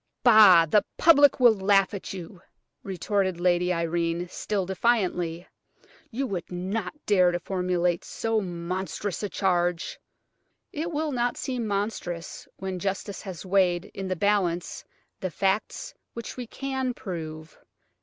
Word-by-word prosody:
"Bah! 210 -8 +8
the 205 +6 +3
public 290 -5 +6
will 240 -3 +7
laugh 195 -1 +3
at 200 - -6
you!" 180 -1 -8 0.4
retorted 190 -1 -1
Lady 180 0 +2
Irene, 170 0 -1
still 200 0 -2
defiantly. 180 -4 0 0.6
"You 255 +4 -2
would 185 -9 -5
not 185 +4 -3
dare 185 -4 +4
to 175 - -2
formulate 180 -2 0
so 225 -1 -1
monstrous 185 +2 -4
a 205 - -2
charge!" 175 -2 0 0.7
"It 325 +3 -3
will 305 0 -1
not 245 -2 0
seem 250 -4 -3
monstrous 200 -4 -4
when 190 -1 -5
justice 195 +1 -3
has 190 -3 -8
weighed 185 -1 +2
in 195 -1 -5
the 185 - -1
balance 180 -3 0 0.4
the 185 - -2
facts 195 - -1 0.2
which 235 -1 -7
we 250 -2 -6
can 265 0 -3
prove. 160 -4 -7
190 Hz, 135 wpm, -26 LUFS, 175-215 Hz, 0.7 s, Bah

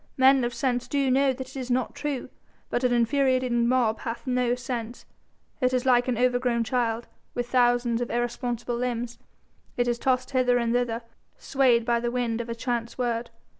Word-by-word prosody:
Men 265 0 +5
of 240 - 0
sense 245 0 -1
do 275 0 +1
know 270 +1 +4
that 260 0 -6
it - - -14
is 260 -2 -5
not 250 0 0
true. 290 -3 -4 0.4
But 245 - 0
an 250 - +3
infuriated 255 +1 +2
mob 235 -1 +2
hath 230 0 -5
no 250 -1 +1
sense. 240 -1 -5 0.6
It 255 0 +2
is 250 +1 0
like 245 -1 +4
an 250 -3 0
overgrown 245 -1 +2
child, 235 -1 -1 0.3
with 245 0 -2
thousands 245 -1 +2
of 245 - -2
irresponsible 240 0 -2
limbs. 240 -1 -3 0.6
It 245 0 +1
is 240 0 0
tossed 255 0 0
hither 250 -2 +3
and 235 -1 0
thither, 240 -1 0 0.3
swayed 250 -4 +2
by 235 -1 +2
the 240 0 -1
wind 240 -2 -1
of 235 - -8
a 230 - -3
chance 235 -1 -3
word. 235 -1 -1
245 Hz, 185 wpm, -26 LUFS, 235-255 Hz, 0.6 s, Men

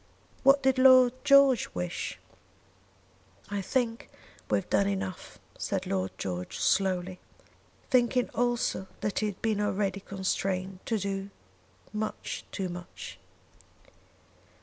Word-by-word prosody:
"What 275 +1 +5
did 265 0 +3
Lord 255 -2 +7
George 275 -4 +6
wish?" 90 -1 -3 1.3
"I 200 -1 -1
think 230 +3 -1 0.4
we - - +3
have - - -4
done 200 - +2
enough," 190 -2 -4 0.2
said - - -2
Lord 95 0 -1
George, 90 -1 -4
slowly, 185 - +1 0.7
thinking 250 -1 +3
also 240 -5 0
that 210 - -1
he 215 - 0
had 200 -2 -6
been 215 -2 +1
already 200 -1 0
constrained 190 -1 -2
to 225 - +1
do 195 0 -3 0.6
much 215 0 -4
too 190 -2 -2
much. 175 0 -8
200 Hz, 115 wpm, -29 LUFS, 185-240 Hz, 1.3 s, Lord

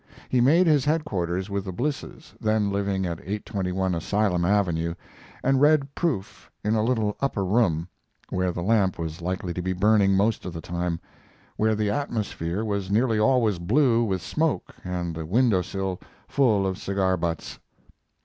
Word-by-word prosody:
He 125 - +3
made 160 +9 +5
his 150 -5 +4
headquarters 95 - -1
with 100 -1 -1
the 95 - -4
Blisses, 135 +10 -4
then 110 -2 +1
living 100 -1 -1
at 85 -2 -3
821 95 -2 -2
Asylum 90 +1 0
Avenue, 85 -4 +1 0.5
and 135 0 +3
read 145 -2 +4
proof 140 - -3
in 105 - +1
a 110 -1 +2
little 110 -3 0
upper 120 -8 -1
room, 90 -6 +2 0.4
where 90 0 0
the 85 0 -4
lamp 100 -2 +2
was 80 0 -5
likely 90 0 -3
to 90 - -3
be 95 +1 -1
burning 100 +1 +4
most 105 +3 +1
of 90 - -6
the 85 - -5
time, 85 0 -3 0.6
where 110 0 +2
the 105 -1 0
atmosphere 105 - -2
was 100 -3 -2
nearly 110 +2 +2
always 110 -5 +3
blue 120 +5 +3
with 95 -6 -1
smoke, 160 - -1
and 90 -2 -3
the 80 0 -5
window 105 +3 +3
sill 95 0 -3 0.3
full 110 -8 +2
of 95 0 -2
cigar 95 -2 +1
butts. 85 -2 -4
100 Hz, 165 wpm, -25 LUFS, 90-115 Hz, 0.6 s, made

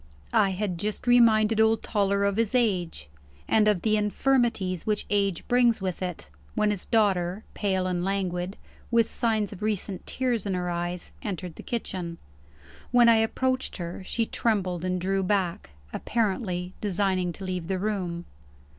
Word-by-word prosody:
I 195 - +4
had 190 -2 -2
just 210 +4 -3
reminded 225 -3 +5
old 220 0 +3
Toller 200 -2 +1
of 200 0 0
his 230 +2 +1
age, 190 - 0 0.4
and 215 -1 +4
of 205 -5 +2
the 215 -1 +3
infirmities 210 -4 +1
which 210 -1 0
age 200 -4 0
brings 245 -2 +4
with 190 -2 -3
it, 180 - -4 0.3
when 210 0 +2
his 200 -3 -4
daughter 195 -3 +1
pale 190 -3 0
and 180 -1 -1
languid, 185 -1 -2 0.3
with 230 -2 +3
signs 220 -4 0
of 190 - -11
recent 205 -3 -2
tears 245 -5 0
in 190 - 0
her 180 -1 -2
eyes 175 +1 -3
entered 185 -4 -4
the - - -9
kitchen. 185 -7 -4 0.7
When 240 -1 +6
I 230 - +6
approached 255 +4 0
her, 175 0 -5
she 230 +4 -1
trembled 190 -7 -1
and 185 0 -1
drew 195 +2 0
back; 185 - -1 0.2
apparently 190 -5 -1
designing 190 -3 0
to 195 - -10
leave 180 -3 -3
the 190 0 -1
room. 180 -4 -2
200 Hz, 160 wpm, -27 LUFS, 180-220 Hz, 0.7 s, When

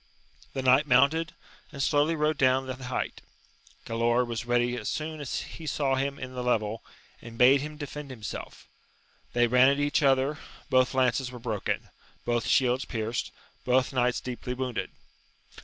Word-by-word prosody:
The 135 - -3
knight 130 +4 +5
mounted, 145 +6 +3 0.4
and 140 - -9
slowly 150 +3 +2
rode 150 0 0
down 130 0 +3
the 130 - -4
height. 125 - -3 0.6
Galaor 120 +1 +1
was 120 0 -5
ready 120 0 +2
as 110 -3 -4
soon 155 0 -4
as 140 - -3
he 160 - -9
saw 140 -3 0
him 135 +1 -1
in 130 0 -7
the 125 - -4
level, 110 -3 0 0.4
and 115 -1 -10
bade 130 +3 +6
him 150 +1 -6
defend 150 -1 -7
himself: 110 -6 -8 0.7
they 120 0 +4
ran 125 +2 +5
at 140 - +1
each 145 +2 +1
other; 135 +2 +2 0.3
both 130 0 +3
lances 130 0 +2
were 125 - -8
broken, 110 -4 -3 0.4
both 120 -1 0
shields 130 0 +3
pierced, 115 0 -3 0.3
both 130 +1 +2
knights 125 -1 +1
deeply 125 0 -5
wounded. 125 -2 -3
130 Hz, 160 wpm, -28 LUFS, 120-140 Hz, 0.7 s, bade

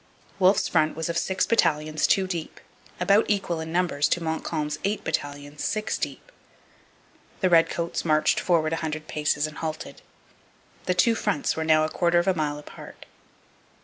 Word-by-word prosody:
Wolfe's 190 +1 +4
front 155 0 +1
was 160 +1 -3
of 170 - -1
six 190 0 0
battalions 155 -7 +1
two 195 - +3
deep, 175 -4 -5 0.4
about 200 +4 +4
equal 195 -5 0
in 160 0 -5
numbers 175 -4 +1
to 175 - 0
Montcalm's 160 -1 -3
eight 205 +2 -1
battalions 145 +1 -4
six 215 0 -1
deep. - - -5 1.1
The 185 -2 +2
redcoats 170 0 +2
marched 155 -2 +2
forward 165 -3 +1
a - - 0
hundred 155 -1 -4
paces 150 0 0
and 155 0 -7
halted. 155 -1 -5 0.8
The 180 - 0
two 230 +5 +4
fronts 205 -9 -1
were 160 - -2
now 155 -1 +4
a - - -3
quarter 175 +1 +1
of 175 - +2
a 190 - +4
mile 150 -3 -2
apart. 150 - -12
165 Hz, 165 wpm, -25 LUFS, 155-180 Hz, 1.1 s, Wolfe's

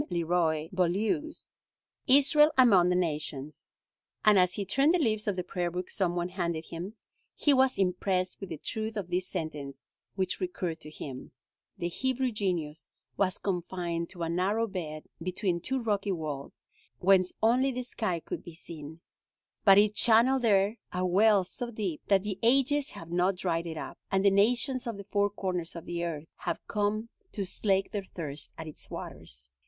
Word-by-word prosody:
Leroy 165 -2 +1
Beaulieu's, 215 - -1 0.6
"Israel 290 +3 +6
Among 200 -9 +6
the 180 - +2
Nations," 150 -4 -3 0.6
and 210 -2 +7
as 180 0 +3
he 200 - -3
turned 280 - +3
the - - +4
leaves 215 -9 0
of 205 - +1
the 180 - -2
prayer 175 -1 -2
book 180 +1 -5
some 175 -3 0
one 175 0 -1
handed 170 -3 -2
him, 180 +6 -7 0.4
he 290 - +3
was 265 -1 +3
impressed 185 0 0
with 195 - -6
the 160 - -5
truth 220 +6 -4
of 180 -4 -4
this 180 +1 0
sentence 150 -6 -5 0.3
which 190 -2 -1
recurred 180 -2 -3
to 155 - -10
him: 135 -4 -8 0.4
"The 175 - -2
Hebrew 260 +7 -1
genius 165 - -2 0.3
was 190 -1 +1
confined 175 -2 -2
to 175 -3 -6
a 165 - -1
narrow 195 +6 +1
bed 160 -7 -5 0.2
between 180 0 -1
two 265 +9 -1
rocky 205 -4 0
walls, 150 -5 -6 0.3
whence 185 -1 +4
only 250 +4 +4
the 255 0 -3
sky 215 -7 -2
could - - -6
be 170 - -10
seen; 160 -1 -9 0.6
but 195 -2 +8
it 210 0 +5
channeled 240 +4 +4
there 205 -1 +3
a 180 0 -1
well 200 +2 +5
so 240 +6 -5
deep 205 -8 -3
that 195 -2 +4
the 205 -3 -4
ages 275 +4 +3
have 170 0 -9
not 180 +2 +2
dried 170 -2 -1
it 160 -1 -5
up, - - -7
and 195 +1 +2
the 200 - +7
nations 240 +6 +2
of 230 -3 -3
the 200 - -7
four 205 +1 +1
corners 180 -4 -3
of 170 - -7
the 170 0 -3
earth 160 -3 -3
have - - -2
come 210 +2 -1 0.2
to 200 -3 -2
slake 195 +1 0
their 205 -2 -3
thirst 150 -6 -5
at 160 - -6
its 155 - -6
waters." 60 +3 -6
185 Hz, 180 wpm, -29 LUFS, 170-215 Hz, 0.6 s, but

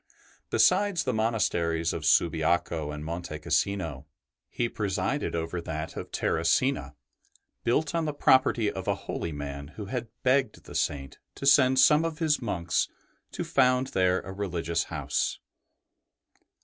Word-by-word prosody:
Besides 190 -2 +3
the 130 - -1
monasteries 85 -7 0
of - - -3
Subiaco 80 -1 +2
and 75 0 -6
Monte 85 -1 -5
Cassino, 80 -5 -1 0.4
he 120 - -1
presided 100 +3 -2
over 85 +1 -3
that 80 -1 -5
of - - -6
Terracina, 80 - 0 0.7
built 145 +5 +1
on 165 -1 0
the 150 - -1
property 130 -6 +3
of 95 0 -7
a 100 - +2
holy 85 - -3
man 70 -1 -6
who 105 - -5
had 120 +3 -4 0.2
begged 130 -3 +1
the - - -11
Saint 70 -1 -2 0.2
to - - -6
send 130 -2 +5
some 150 +4 +6
of 165 -2 -3
his 155 -3 +1
monks 90 -7 0 0.5
to - - -3
found 130 0 +2
there 95 0 +2
a 95 - -8
religious 85 -4 -2
house. - - -2
95 Hz, 140 wpm, -28 LUFS, 80-130 Hz, 0.7 s, some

